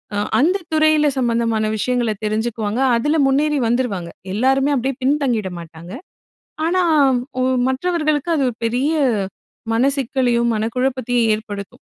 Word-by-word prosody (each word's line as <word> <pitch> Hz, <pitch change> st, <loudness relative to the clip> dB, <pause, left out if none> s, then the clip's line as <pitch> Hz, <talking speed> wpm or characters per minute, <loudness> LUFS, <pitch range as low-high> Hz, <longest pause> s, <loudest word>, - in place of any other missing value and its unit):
அ -, -, -1 dB, 0.2 s
அந்த 345 Hz, +9 st, +3 dB, 0.2 s
துறையில 310 Hz, -1 st, +4 dB
சம்மந்தமான 230 Hz, -3 st, 0 dB
விஷயங்களை 240 Hz, 0 st, 0 dB
தெரிஞ்சுக்குவாங்க. 215 Hz, +1 st, -2 dB, 0.2 s
அதில 295 Hz, +7 st, 0 dB
முன்னேறி 290 Hz, +2 st, +1 dB
வந்துருவாங்க. 225 Hz, -8 st, -1 dB, 0.2 s
எல்லாருமே 270 Hz, +6 st, +2 dB
அப்படியே 265 Hz, +1 st, -1 dB
பின்தங்கிட 255 Hz, -8 st, 0 dB
மாட்டாங்க! 165 Hz, +1 st, -11 dB, 0.8 s
ஆனா 365 Hz, +2 st, +2 dB, 0.6 s
ஓ -, -, +1 dB, 0.3 s
மற்றவர்களுக்கு 305 Hz, +1 st, -1 dB
அது 285 Hz, -, +1 dB
ஒரு 240 Hz, -, -8 dB
பெரிய 250 Hz, +6 st, 0 dB, 0.8 s
மனசிக்கலையும், 250 Hz, -2 st, +1 dB
மனக்குழப்பத்தையும் 245 Hz, +1 st, 0 dB
ஏற்படுத்தும். 205 Hz, -2 st, -8 dB
250 Hz, 110 wpm, -19 LUFS, 225-280 Hz, 0.8 s, துறையில